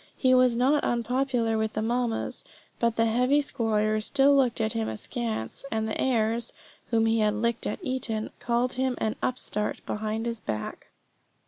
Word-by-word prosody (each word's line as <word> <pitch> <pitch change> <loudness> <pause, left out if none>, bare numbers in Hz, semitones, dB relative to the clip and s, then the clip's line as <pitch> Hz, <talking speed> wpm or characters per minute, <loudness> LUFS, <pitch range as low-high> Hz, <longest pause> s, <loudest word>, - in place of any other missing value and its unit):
He 255 -1 +3
was 255 -2 +5
not 270 +5 +3
unpopular 240 -1 0
with 220 0 -1
the 215 - -1
mammas; 235 0 -1 0.4
but 235 -1 +1
the 230 - +3
heavy 250 +5 +3
squires 215 -5 0
still 280 0 +4
looked 255 -4 +2
at 220 -1 0
him 110 -1 -1
askance, 110 0 -4
and 220 0 -1
the 220 - -2
heirs 230 -2 0 0.4
(whom 225 -1 +3
he 225 0 +2
had 210 -1 +2
licked 235 +2 0
at - - -2
Eton) 240 -6 -2
called 240 +1 0
him 260 0 0
an 220 - -1
upstart 210 -4 -1
behind 215 +1 -2
his 230 -1 -3
back. 110 - -5
230 Hz, 165 wpm, -27 LUFS, 215-250 Hz, 0.4 s, was